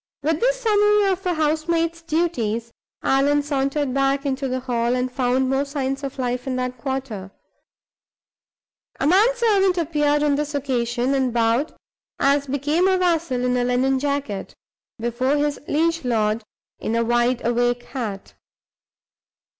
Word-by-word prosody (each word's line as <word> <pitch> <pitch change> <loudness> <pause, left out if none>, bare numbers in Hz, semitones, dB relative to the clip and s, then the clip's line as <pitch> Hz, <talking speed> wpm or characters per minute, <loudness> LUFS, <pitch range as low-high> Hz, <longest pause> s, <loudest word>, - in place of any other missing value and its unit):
With 315 +1 +1
this - - +1
summary 415 -2 +3
of 380 0 -3
a 355 - +1
housemaid's 330 +2 0
duties, 245 -9 -1 0.3
Allan 285 +2 +3
sauntered 275 -1 -1
back 275 +1 +1
into 270 0 -1
the 255 0 -2
hall, 240 -1 0
and 255 0 -1
found 255 0 +1
more 270 +1 +1
signs 275 -1 -3
of 275 0 -5
life 250 0 -2
in 260 - -1
that 250 -1 -3
quarter. 255 -7 -4 1.7
A - - 0
man 380 +9 +5
servant 400 -6 +2
appeared 295 -3 +1
on 295 -1 +3
this 295 0 -3
occasion, 250 -2 0
and 265 -2 +1
bowed, 235 +5 +1 0.4
as 280 0 +2
became 295 +7 +1
a 380 -1 +3
vassal 330 -8 0
in 250 0 +1
a 245 - +1
linen 255 +2 +1
jacket, 280 -8 -3 0.4
before 240 +5 0
his 290 0 0
liege 330 +2 +1
lord 220 -2 +1 0.4
in 225 - -2
a 230 - +2
wide 240 +1 +1
awake 240 0 +1
hat. 220 -7 -6
275 Hz, 145 wpm, -22 LUFS, 245-310 Hz, 1.7 s, man